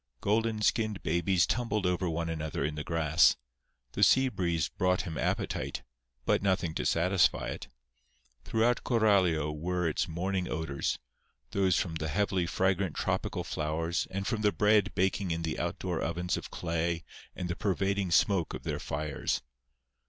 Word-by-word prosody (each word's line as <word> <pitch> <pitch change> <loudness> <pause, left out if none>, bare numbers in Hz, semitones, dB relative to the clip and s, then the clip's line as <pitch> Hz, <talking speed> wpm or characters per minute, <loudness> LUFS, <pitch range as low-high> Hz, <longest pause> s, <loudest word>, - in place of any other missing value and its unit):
Golden 110 +1 0
skinned 110 -3 +1
babies 85 +1 +2
tumbled 110 -5 -1
over 90 0 +1
one 85 0 -2
another 80 -3 -2
in 75 - -2
the 75 0 -4
grass. 80 0 +4 0.6
The 100 - -4
sea 130 +6 +5
breeze 85 - 0
brought 90 0 0
him 80 - -5
appetite, - - -2 0.4
but - - +2
nothing 95 -4 +1
to - - -1
satisfy 90 +1 +2
it. - - -6 0.8
Throughout 115 +2 +1
Coralio 95 - +3
were 90 +2 -1
its 80 - 0
morning 90 +2 -2
odors—those 80 +4 -2
from 80 -3 -2
the 80 0 -3
heavily 95 +2 0
fragrant 95 -1 0
tropical - - -1
flowers 80 +3 -2
and 95 +1 -3
from 110 -1 -1
the 105 -1 +3
bread 105 0 +3
baking 95 +1 +1
in 85 0 -2
the 80 -1 -2
outdoor 85 0 -2
ovens 90 +2 -1
of - - -6
clay 85 0 -2 0.3
and 90 - -4
the 90 - -2
pervading 100 -1 0
smoke 90 0 +2
of - - -8
their - - -2
fires. 75 -2 -2
90 Hz, 150 wpm, -30 LUFS, 80-100 Hz, 0.8 s, sea